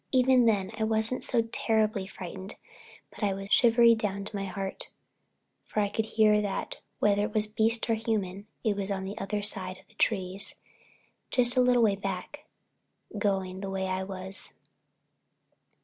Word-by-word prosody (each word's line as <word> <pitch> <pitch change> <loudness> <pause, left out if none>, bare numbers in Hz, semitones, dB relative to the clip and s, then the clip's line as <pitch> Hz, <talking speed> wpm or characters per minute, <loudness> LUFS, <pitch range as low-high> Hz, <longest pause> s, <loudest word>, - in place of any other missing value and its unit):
Even 255 -2 +5
then 200 -3 +1
I - - +1
wasn't 220 +3 0
so 235 -2 +2
terribly 215 -3 +1
frightened, 190 +1 -8 0.6
but - - -8
I 200 -2 +1
was 195 0 -7
shivery, 235 -1 +6
shivery - - +8
down 200 -3 -3
to 205 - -3
my 195 -1 -2
heart, 195 0 -5 0.8
for - - -2
I 205 -1 +2
could 220 +2 -1
hear 215 -1 +4
that, 200 -2 -3 0.2
whether 205 -1 +3
it 210 +1 -2
was 215 -1 +4
beast 225 +2 0
or 230 - +2
human, 210 -3 -2 0.2
it 215 -3 +1
was 200 0 -3
on 195 -1 -2
the 195 +2 -5
other 205 +1 -2
side 185 -2 -2
of - - -20
the - - -24
trees, 190 -2 +1 0.7
just 245 0 +3
a 255 - +5
little 250 -1 +4
way 205 -3 +4
back, 200 +9 -5 0.7
going 190 -2 -1
the 195 - -4
way 190 0 -2
I 185 0 -1
was. 190 0 -8
205 Hz, 175 wpm, -28 LUFS, 195-225 Hz, 0.8 s, shivery